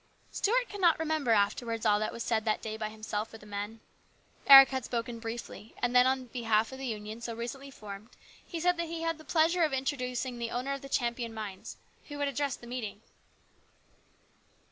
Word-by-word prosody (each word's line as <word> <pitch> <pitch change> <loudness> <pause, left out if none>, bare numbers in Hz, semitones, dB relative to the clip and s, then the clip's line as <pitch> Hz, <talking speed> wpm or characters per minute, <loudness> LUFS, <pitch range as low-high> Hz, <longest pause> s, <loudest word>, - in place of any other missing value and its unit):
Stuart 485 +4 +1
could 410 -1 -7
not 340 -3 +5
remember 315 -5 -1
afterwards 225 +2 +1
all 210 -1 +4
that 215 - -1
was 230 - -5
said 220 -2 0
that 215 -1 0
day 220 -1 -4
by 215 -1 -3
himself 215 0 -4
or - - -7
the 210 - -16
men. 205 +2 -5 0.7
Eric 270 -1 +11
had 260 -2 -2
spoken 235 0 -3
briefly, 230 -1 -7
and 245 +1 0
then 250 +1 +7
in 260 0 0
behalf 225 -2 +1
of 265 - -8
the 270 - -4
Union 215 0 -5
so 235 -1 -4
recently 270 +4 -6
formed 210 -3 -10 0.3
he 335 - -6
said 355 +1 +2
that 340 0 -2
he 330 0 -5
had 330 -1 -1
the - - -12
pleasure 330 +3 +2
of 310 -4 +2
introducing 255 -2 -2
the 235 -1 -2
owner 255 +4 -2
of 275 - -5
the 275 - -9
Champion 235 -3 -1
mines, 205 -4 -7 0.3
who 290 - -7
would 285 0 0
address 280 0 -1
the - - -14
meeting. 225 -4 -5
245 Hz, 205 wpm, -30 LUFS, 220-275 Hz, 0.7 s, Eric